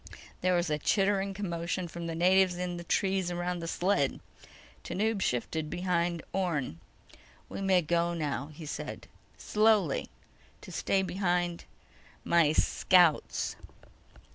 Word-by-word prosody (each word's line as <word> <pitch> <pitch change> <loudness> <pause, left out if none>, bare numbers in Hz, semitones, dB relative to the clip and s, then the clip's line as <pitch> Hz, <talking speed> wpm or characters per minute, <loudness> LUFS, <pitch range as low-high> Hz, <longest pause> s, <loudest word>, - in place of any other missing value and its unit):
There 185 0 +2
was 175 -2 0
a 150 - 0
chittering 195 +2 +1
commotion 175 -2 -3
from 170 0 -6
the 165 - -3
natives 185 +1 +4
in 180 -1 -3
the 170 - -7
trees 190 0 0
around 175 0 -2
the 165 - -5
sled. 175 -5 +1 0.6
Tanub 215 0 -1
shifted 150 +5 -1
behind 175 -1 -1
Orne. 160 - -1 0.7
"We - - -6
may 190 -2 +3
go 170 +2 +1
now," 145 -3 -2
he 155 +1 -10
said. 150 - -6 0.3
"Slowly... 210 -8 +2 0.5
to - - -11
stay 195 -1 +1
behind 175 -2 -1 0.6
my... 170 -3 +4
scouts." 175 0 +3
175 Hz, 125 wpm, -30 LUFS, 170-190 Hz, 0.7 s, natives